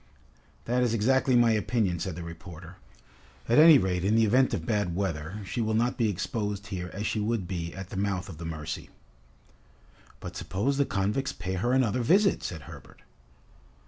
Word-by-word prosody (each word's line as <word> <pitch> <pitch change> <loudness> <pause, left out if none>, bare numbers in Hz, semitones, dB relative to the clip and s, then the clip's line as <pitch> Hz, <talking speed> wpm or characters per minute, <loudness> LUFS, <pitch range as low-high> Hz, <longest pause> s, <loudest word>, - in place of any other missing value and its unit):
"That 125 +2 +1
is 120 -2 +1
exactly 130 +3 +2
my 120 -1 +5
opinion," 105 -4 0
said 95 -2 -4
the 85 - -6
reporter. 85 +1 -10 0.7
"At 120 +5 +4
any 160 -1 +9
rate 90 -4 0
in 105 +3 +2
the 115 0 +4
event 130 +5 +3
of - - -3
bad 105 -6 0
weather, 90 0 -3
she 115 - -3
will 110 -1 0
not 120 +2 +1
be 115 -3 +1
exposed 105 +1 -3
here 90 -1 -4
as 105 +2 -5
she 110 - -1
would 105 -3 -1
be 85 -3 -4
at 95 -1 -7
the - - -5
mouth 95 -1 -1
of 80 -5 -10
the - - -7
Mercy." 80 -1 -6 1.3
"But 85 - -8
suppose 100 +10 -1
the 140 - +4
convicts 105 +8 -1
pay 90 +2 -5
her 100 +7 0
another 125 -2 +2
visit," 195 - +3
said 80 -3 -5
Herbert. - - -13
100 Hz, 185 wpm, -28 LUFS, 90-120 Hz, 1.3 s, any